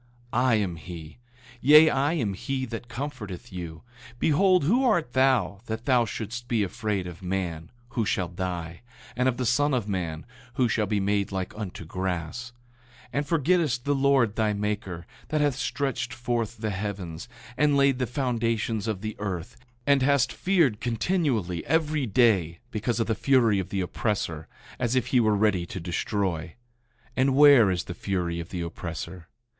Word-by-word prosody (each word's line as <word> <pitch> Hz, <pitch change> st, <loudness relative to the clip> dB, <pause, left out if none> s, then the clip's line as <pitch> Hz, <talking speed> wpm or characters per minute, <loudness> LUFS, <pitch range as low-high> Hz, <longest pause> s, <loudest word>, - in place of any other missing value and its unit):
8:12 120 Hz, -, +2 dB
I 125 Hz, -2 st, +4 dB
am 100 Hz, -5 st, 0 dB
he; 80 Hz, 0 st, -9 dB, 0.4 s
yea, 150 Hz, +4 st, +8 dB
I 140 Hz, +4 st, +1 dB
am 115 Hz, -12 st, -1 dB
he 130 Hz, +7 st, -3 dB
that 115 Hz, 0 st, -7 dB
comforteth 120 Hz, -6 st, -6 dB
you. 85 Hz, -2 st, -7 dB, 0.3 s
Behold, 180 Hz, +6 st, +3 dB
who 235 Hz, -, +3 dB
art 175 Hz, -, +2 dB
thou, 130 Hz, -8 st, +2 dB
that 110 Hz, +1 st, -4 dB
thou 125 Hz, -3 st, +4 dB
shouldst 120 Hz, +3 st, -5 dB
be 115 Hz, -4 st, +1 dB
afraid 105 Hz, -1 st, -2 dB
of 90 Hz, +1 st, -8 dB
man, 90 Hz, -3 st, -3 dB, 0.2 s
who 115 Hz, -, -1 dB
shall 100 Hz, -3 st, 0 dB
die, 85 Hz, -2 st, -5 dB, 0.3 s
and 125 Hz, +1 st, +2 dB
of 120 Hz, -, -3 dB
the 125 Hz, -, -1 dB
son 145 Hz, +4 st, +2 dB
of 115 Hz, -5 st, -1 dB
man, 85 Hz, -5 st, -3 dB, 0.3 s
who 125 Hz, -2 st, +3 dB
shall 105 Hz, -1 st, 0 dB
be 105 Hz, 0 st, 0 dB
made 100 Hz, +1 st, 0 dB
like 95 Hz, -1 st, -3 dB
unto 100 Hz, -5 st, -6 dB
grass? 90 Hz, +7 st, -4 dB, 0.5 s
8:13 -, -, -22 dB
And 140 Hz, +1 st, -1 dB
forgettest 155 Hz, -5 st, +1 dB
the 145 Hz, -, +2 dB
Lord 135 Hz, -6 st, +3 dB
thy 110 Hz, -2 st, +1 dB
maker, 100 Hz, -4 st, -3 dB, 0.2 s
that 155 Hz, -, 0 dB
hath 145 Hz, -2 st, +2 dB
stretched 125 Hz, -2 st, -2 dB
forth 120 Hz, -1 st, -2 dB
the 110 Hz, -1 st, -2 dB
heavens, 95 Hz, 0 st, -5 dB, 0.3 s
and 145 Hz, 0 st, +3 dB
laid 140 Hz, -2 st, +3 dB
the 125 Hz, -, 0 dB
foundations 115 Hz, -4 st, -1 dB
of 105 Hz, -4 st, -2 dB
the 110 Hz, 0 st, -4 dB
earth, 95 Hz, +1 st, -4 dB, 0.3 s
and 140 Hz, -1 st, +4 dB
hast 135 Hz, -3 st, +3 dB
feared 165 Hz, -, +2 dB
continually 115 Hz, -, 0 dB
every 155 Hz, -3 st, +1 dB
day, 100 Hz, -7 st, +3 dB
because 115 Hz, +2 st, -1 dB
of 115 Hz, -, +2 dB
the 115 Hz, -, 0 dB
fury 115 Hz, -3 st, +3 dB
of 95 Hz, -, -4 dB
the 95 Hz, -, -1 dB
oppressor, 90 Hz, -4 st, -2 dB, 0.3 s
as 120 Hz, 0 st, 0 dB
if 125 Hz, -1 st, +1 dB
he 125 Hz, -, +6 dB
were 110 Hz, -2 st, +3 dB
ready 100 Hz, -4 st, +2 dB
to 95 Hz, -, -6 dB
destroy? 85 Hz, -1 st, -2 dB, 0.6 s
And 130 Hz, +1 st, +2 dB
where 140 Hz, -7 st, +8 dB
is 90 Hz, -2 st, 0 dB
the 90 Hz, -, -6 dB
fury 85 Hz, -2 st, -2 dB
of 85 Hz, -, -6 dB
the 90 Hz, -, -4 dB
oppressor? 85 Hz, 0 st, -6 dB
110 Hz, 175 wpm, -26 LUFS, 95-130 Hz, 0.6 s, yea